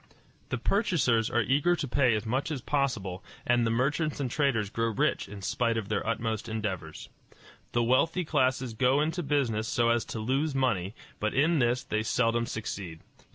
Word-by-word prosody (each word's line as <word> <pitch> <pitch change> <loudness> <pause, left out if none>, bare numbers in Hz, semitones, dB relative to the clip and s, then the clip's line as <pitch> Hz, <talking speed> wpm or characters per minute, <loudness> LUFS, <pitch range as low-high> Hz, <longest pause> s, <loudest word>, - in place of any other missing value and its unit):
The - - -1
purchasers 140 - +1
are 120 0 +2
eager 145 +8 +2
to 150 - -3
pay 130 -3 +3
as 105 - -3
much 130 +7 -1
as 140 -5 -4
possible, 120 -11 -1 0.2
and 120 -1 +3
the - - +1
merchants 145 +7 0
and 130 -4 -2
traders 120 -9 +1
grow 115 0 0
rich 110 - 0
in 100 -1 -9
spite 115 +3 0
of 105 -3 -4
their 105 - 0
utmost 115 -1 -2
endeavors. 95 -8 -4 0.6
The 120 - +2
wealthy 165 +9 +2
classes 130 -4 +1
go 125 +5 +3
into 160 +4 0
business 130 -8 0
so 115 0 +2
as 115 -1 +2
to - - -6
lose 135 +7 0
money, 105 -7 0 0.2
but 105 0 -1
in 155 +4 +3
this 120 +1 +1
they 110 - -1
seldom 115 +1 +1
succeed. 95 -7 -5
120 Hz, 180 wpm, -29 LUFS, 110-140 Hz, 0.6 s, pay